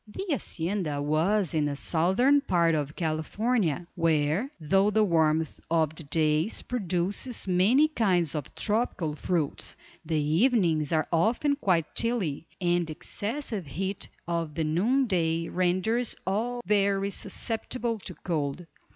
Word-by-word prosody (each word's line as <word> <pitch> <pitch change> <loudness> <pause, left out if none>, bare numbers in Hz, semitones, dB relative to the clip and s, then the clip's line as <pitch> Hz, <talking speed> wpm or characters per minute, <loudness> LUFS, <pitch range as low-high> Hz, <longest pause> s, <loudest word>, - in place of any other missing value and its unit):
The 300 - -6
hacienda 175 - -2
was 160 +6 +1
in 155 -2 +1
the 145 -1 -1
southern 190 - +3
part 170 -7 +2
of 150 -1 -2
California, 175 - -1
where 165 - +1
though 195 +6 +3
the 215 +1 +3
warmth 160 -4 +1
of 160 -2 +2
the 160 - -6
days 155 +5 0
produces 200 +1 -2
many 205 +12 +4
kinds 185 - +1
of 150 -4 -5
tropical 210 -8 0
fruits, 160 -2 -2 0.3
the 160 0 -2
evenings 160 - +2
are 155 -2 +1
often 235 - +2
quite 180 - 0
chilly, 190 -11 0
and 175 -2 +1
the 155 - -5
excessive 215 - -4
heat 190 +7 -4 0.2
of 165 -3 -2
the 165 - 0
noon 210 - +2
day 165 -5 0
renders 185 +7 +1
all 240 +5 -1
very 200 -1 +2
susceptible 230 +2 -2
to - - -9
cold. 155 -1 -3
175 Hz, 135 wpm, -27 LUFS, 160-215 Hz, 0.3 s, many